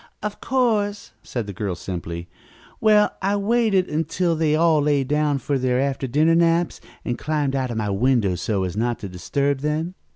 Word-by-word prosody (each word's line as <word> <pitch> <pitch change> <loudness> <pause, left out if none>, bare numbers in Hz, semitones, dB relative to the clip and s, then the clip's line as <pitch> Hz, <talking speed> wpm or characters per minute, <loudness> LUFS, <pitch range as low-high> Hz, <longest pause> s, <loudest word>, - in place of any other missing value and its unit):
"Of 210 -1 -4
course," 215 -6 0
said 120 -4 -4
the 100 - -6
girl 95 -1 -3
simply. 85 -1 -6 0.5
"Well, 210 -1 +4
I 200 +1 +1
waited 205 -2 +2
until 165 +3 0
they 155 -1 +2
all 160 -1 +4
lay 145 -1 +2
down 150 +1 +1
for 140 0 -1
their 125 0 +1
after 135 0 -1
dinner 155 +6 +3
naps, 170 +1 +2 0.2
and 120 - -2
climbed 150 -3 -1
out 130 -1 -1
of 115 - -4
my 105 -2 -1
window 110 -2 +2
so 95 +2 -1
as 90 -1 -3
not 120 +1 0
to 100 - -4
disturb 140 +10 -1
them. 155 +4 -2
145 Hz, 185 wpm, -22 LUFS, 120-170 Hz, 0.5 s, Well